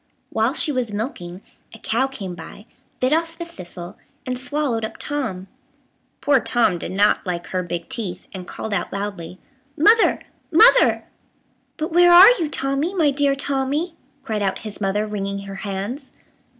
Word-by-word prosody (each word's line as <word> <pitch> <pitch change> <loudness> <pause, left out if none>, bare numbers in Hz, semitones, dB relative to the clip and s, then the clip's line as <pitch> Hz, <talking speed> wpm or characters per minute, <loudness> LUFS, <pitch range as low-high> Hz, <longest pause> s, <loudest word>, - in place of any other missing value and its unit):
While 225 +6 +1
she 305 - +2
was 250 -5 -2
milking, 205 - -5 0.3
a - - -11
cow 235 +4 0
came 200 -9 -7
by, 175 +5 -11 0.3
bit 255 +3 +2
off 330 +1 -1
the 340 - -5
thistle, 180 - -10 0.3
and 255 - -2
swallowed 255 -2 -2
up 220 - -5
Tom. 225 -11 -3 0.7
Poor 285 -2 +4
Tom 230 -8 +1
did - - -6
not 205 +2 +2
like 175 -2 -4
her 185 - -1
big 175 -1 -5
teeth, 215 -9 -5
and 185 -2 -8
called 220 - -5
out - - -2
loudly, 195 -4 -5 0.4
"Mother, 435 +9 +4 0.3
mother!" 460 +9 +6 0.7
"But 315 0 -3
where 350 0 +6
are 370 +6 +10
you, 320 -3 -1
Tommy, 275 +6 -1
my 310 -5 +3
dear 280 0 +1
Tommy?" 280 +5 -1 0.3
cried 220 -5 -3
out 195 -1 0
his 210 -1 -7
mother, 200 +2 0
wringing 200 -1 -4
her 195 0 -8
hands. 205 +8 -5
230 Hz, 165 wpm, -21 LUFS, 195-290 Hz, 0.7 s, are